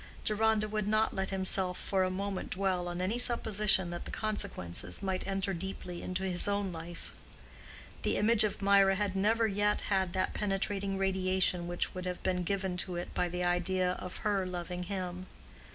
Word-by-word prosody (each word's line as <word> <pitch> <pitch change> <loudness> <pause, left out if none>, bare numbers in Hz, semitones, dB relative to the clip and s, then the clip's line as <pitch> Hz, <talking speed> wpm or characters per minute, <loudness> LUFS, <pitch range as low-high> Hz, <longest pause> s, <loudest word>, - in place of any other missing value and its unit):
Deronda 215 0 +2
would 215 -1 -2
not 215 +1 +2
let 190 0 -2
himself 190 -1 +2
for 195 -2 0
a 185 - +1
moment 195 +1 -3
dwell 185 -2 0
on 175 +1 -3
any 215 +6 0
supposition 210 -6 +3
that 175 - -5
the - - -6
consequences 90 - -3
might 190 -1 -2
enter 195 0 -1
deeply 180 -1 -5
into 185 +1 -3
his 185 -1 +1
own 200 -1 0
life. 165 +1 -8 0.9
The - - +1
image 220 +1 +5
of 205 -1 -1
Mirah 195 -1 +5
had 200 -1 -1
never 220 +4 +3
yet 205 0 +1
had 190 -3 0
that 185 0 0
penetrating 195 -1 -1
radiation 185 -2 +1
which 175 0 -2
would 185 0 -5
have 180 -1 -4
been 180 -1 0
given 190 0 -1
to 180 0 0
it 175 - -5
by 180 - 0
the 180 +1 -2
idea 180 +1 +1
of 180 0 -6
her 200 -2 +2
loving 180 0 -4
him. 185 -1 -4
190 Hz, 180 wpm, -32 LUFS, 180-200 Hz, 0.9 s, image